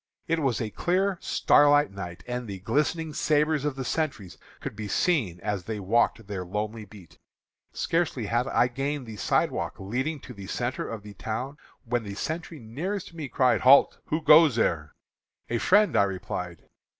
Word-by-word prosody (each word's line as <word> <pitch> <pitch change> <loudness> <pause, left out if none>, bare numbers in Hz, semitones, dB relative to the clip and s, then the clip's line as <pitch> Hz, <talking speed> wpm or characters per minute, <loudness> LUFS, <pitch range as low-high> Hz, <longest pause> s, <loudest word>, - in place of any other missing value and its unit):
"It 165 0 +1
was 135 -6 0
a 110 -3 -3
clear, 185 - 0
starlight 145 -4 +4
night, 90 -3 -8
and 125 -1 -4
the 100 -2 -5
glistening 150 - -1
sabres 150 0 +1
of 145 -3 -1
the 135 -1 -5
sentries 125 - -2 0.2
could - - -6
be 105 -1 -5
seen 110 - +1
as 100 -3 -3
they 110 -2 -4
walked 115 +2 +1
their 95 -2 -4
lonely 105 +4 -4
beat. 95 -4 -16 0.5
Scarcely 165 -9 -1
had 120 +4 0
I 125 - +3
gained 135 +2 -3
the 110 -2 -9
sidewalk - - 0
leading 130 +10 -2
to 125 - -10
the 100 -3 -10
centre 120 +5 -3
of 115 -3 -6
the 105 -1 -10
town 125 +8 -5 0.3
when 120 +1 0
the 100 -2 -7
sentry 160 +7 -4
nearest 170 - -5
me 155 -5 -6
cried, 130 0 +2
'Halt! 135 +2 +6
who 155 +1 -2
goes 155 -4 +7
there?' 80 -9 0 0.6
'A 120 - +1
friend,' 205 - +4
I 100 - +5
replied. 90 -3 -5
120 Hz, 175 wpm, -27 LUFS, 105-150 Hz, 0.6 s, goes